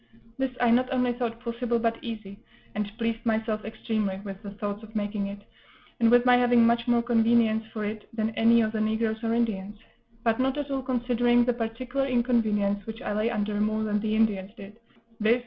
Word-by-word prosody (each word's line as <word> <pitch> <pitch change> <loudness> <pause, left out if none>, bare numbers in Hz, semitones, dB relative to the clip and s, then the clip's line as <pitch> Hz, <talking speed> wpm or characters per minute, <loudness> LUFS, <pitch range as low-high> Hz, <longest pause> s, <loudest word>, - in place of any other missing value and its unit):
This 265 0 +1
I 240 -1 +4
not 255 +2 +3
only 250 -2 +1
thought 235 -2 -3
possible, 235 0 -1
but 230 0 -1
easy, 215 -4 -7 0.3
and 210 -1 -3
pleased 230 -1 -2
myself 220 -1 -1
extremely 215 -3 -2
with 195 0 -7
the 205 - -7
thoughts 205 0 -5
of 220 0 -13
making 205 -1 -2
it, 200 +1 -6 0.6
and 230 -1 +4
with 245 +1 +5
my 250 -1 +6
having 245 -1 +5
much 235 +1 +2
more 240 -1 +3
convenience 230 -1 +3
for 215 -2 -4
it 215 +1 -6
than 220 -1 -1
any 230 +1 +4
of 215 -1 0
the 220 -1 -2
negroes 220 +1 -1
or 230 0 +1
Indians; 210 -3 -1 0.5
but 225 0 +1
not 265 +2 +1
at 290 -1 -3
all 270 -1 -1
considering 245 -1 +2
the 245 - +2
particular 245 +4 -2
inconvenience 220 -5 +1
which 225 0 -7
I - - -2
lay 215 +2 +1
under 210 -2 -1
more 215 +1 0
than 210 -1 0
the 215 0 -1
Indians 210 -3 +1
did, 205 +2 -11 0.4
viz. 225 +3 +3
225 Hz, 200 wpm, -27 LUFS, 215-240 Hz, 0.6 s, my